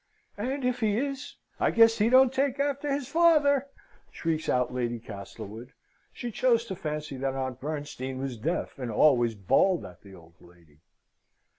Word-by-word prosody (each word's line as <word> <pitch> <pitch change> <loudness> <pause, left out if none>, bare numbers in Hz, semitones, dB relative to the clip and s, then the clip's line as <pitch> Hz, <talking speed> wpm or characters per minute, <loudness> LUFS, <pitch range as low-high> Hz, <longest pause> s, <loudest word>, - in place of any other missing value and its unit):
"And 260 +4 -2
if 250 0 0
he 215 -3 +1
is, 275 +2 -4 0.2
I - - +3
guess 225 -1 +5
he 215 +2 +3
don't 260 0 +6
take 275 0 0
after 280 0 -1
his 275 -2 -2
father," 290 -3 +4 0.4
shrieks 160 -1 -2
out 125 -1 +1
Lady 120 -1 -2
Castlewood. 110 +2 -9 0.4
She 240 - -6
chose 235 0 +2
to 195 - -5
fancy 150 -4 -5
that 135 0 -2
Aunt 130 -1 -4
Bernstein 145 -3 -5
was 135 -1 -4
deaf, 150 +5 -3
and 125 -2 -4
always 120 -1 +3
bawled 135 - +2
at 90 0 -13
the 100 -2 -14
old 85 -2 -17
lady. 85 -4 -21
155 Hz, 165 wpm, -28 LUFS, -, 0.4 s, don't